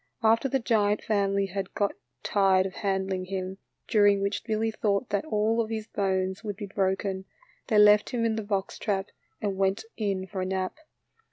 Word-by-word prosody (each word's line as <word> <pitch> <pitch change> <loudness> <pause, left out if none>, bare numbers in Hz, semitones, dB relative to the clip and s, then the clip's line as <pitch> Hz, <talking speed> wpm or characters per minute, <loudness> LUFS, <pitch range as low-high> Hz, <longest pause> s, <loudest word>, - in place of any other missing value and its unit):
After 230 +4 +4
the 270 - +2
giant 215 -4 +1
family 200 -2 +1
had 195 0 -5
got 205 -2 +1 0.3
tired 190 -2 +3
of 190 - -4
handling 190 -2 -1
him, 190 0 -4 0.3
during 205 -3 +4
which 200 +1 -1
Billy 225 0 0
thought 210 +1 0
that 205 - -1
all 225 -3 +1
of 220 - -3
his 220 -1 -3
bones 190 -1 -1
would 205 -2 -4
be 205 +1 -6
broken, 190 -1 -1 0.4
they 220 - +2
left 210 0 +6
him 235 -2 -1
in 225 -1 +1
the 220 - -2
box 200 -2 -2
trap 195 -2 -1 0.3
and 200 -2 -1
went 195 +2 +1
in 195 -4 -1
for 190 0 -5
a - - -1
nap. 190 +7 -2
200 Hz, 185 wpm, -27 LUFS, 190-215 Hz, 0.4 s, left